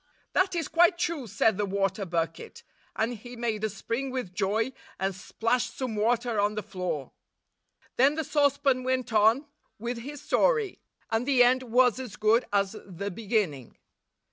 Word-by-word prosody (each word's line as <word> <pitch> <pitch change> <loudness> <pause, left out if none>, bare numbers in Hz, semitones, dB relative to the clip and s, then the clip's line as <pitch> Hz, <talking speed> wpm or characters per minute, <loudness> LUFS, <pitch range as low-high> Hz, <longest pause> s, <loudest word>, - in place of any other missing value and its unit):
'That 370 -1 +2
is 330 -4 -1
quite 345 +3 +4
true,' 315 -7 -2
said 210 0 +2
the 205 - +2
water 195 +1 -1
bucket; 165 -2 -3 0.3
and 230 +2 -1
he 245 +3 -10
made 225 -3 -2
a 220 - +1
spring 230 +6 -3
with 255 -8 -4
joy, 210 +6 0 0.3
and 190 +1 0
splashed 230 +5 -1
some 255 -4 -3
water 230 +1 +1
on 205 +1 +1
the 215 - -3
floor. 180 -8 -4 0.9
Then 275 +4 +5
the 320 - -1
saucepan 280 -2 +2
went 255 -2 -1
on 220 +6 +4 0.3
with 235 +2 -4
his 285 +5 -7
story, 455 - +1 0.3
and 225 +3 0
the 260 -3 +6
end 255 +1 +4
was 250 0 +3
as 250 -6 -7
good 220 +3 +3
as 200 0 +1
the 200 +2 -5
beginning. 195 - -2
230 Hz, 165 wpm, -28 LUFS, 205-260 Hz, 0.9 s, the